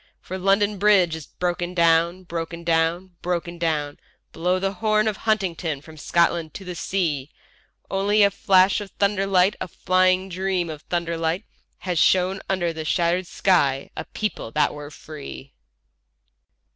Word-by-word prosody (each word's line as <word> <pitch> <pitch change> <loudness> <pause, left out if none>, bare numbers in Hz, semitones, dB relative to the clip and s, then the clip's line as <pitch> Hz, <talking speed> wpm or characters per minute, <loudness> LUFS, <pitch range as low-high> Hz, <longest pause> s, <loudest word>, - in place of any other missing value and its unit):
For 185 +1 -7
London 200 +2 +2
Bridge 190 -5 +4
is 160 -4 -9
broken 175 0 -3
down, 170 +2 +3
broken 170 -1 -5
down, 165 +2 +1
broken 175 -1 -3
down; 150 -3 -1 0.3
Blow 180 +3 0
the 195 +1 -1
horn 215 +1 +1
of 215 - 0
Huntingdon 185 -8 -1
from 160 +1 -13
Scotland 170 +1 0
to 195 - -8
the 180 - -5
sea—... 155 -5 -2 0.6
Only 205 +2 +2
a 200 - +4
flash 190 0 +3
of 205 - -7
thunder 200 -1 +1
light, 190 +1 +3
a - - -2
flying 185 +2 +2
dream 185 -2 -1
of 150 -1 -8
thunder 170 -1 -2
light, 165 +5 -1 0.3
Had 180 -3 -2
shown 190 +3 +3
under 175 -3 0
the 160 -1 -5
shattered 175 +2 +1
sky 140 -10 +1
a - - -5
people 210 - -4
that 150 -1 +2
were 145 0 -8
free. 145 -2 -10
180 Hz, 155 wpm, -23 LUFS, 165-195 Hz, 0.6 s, Bridge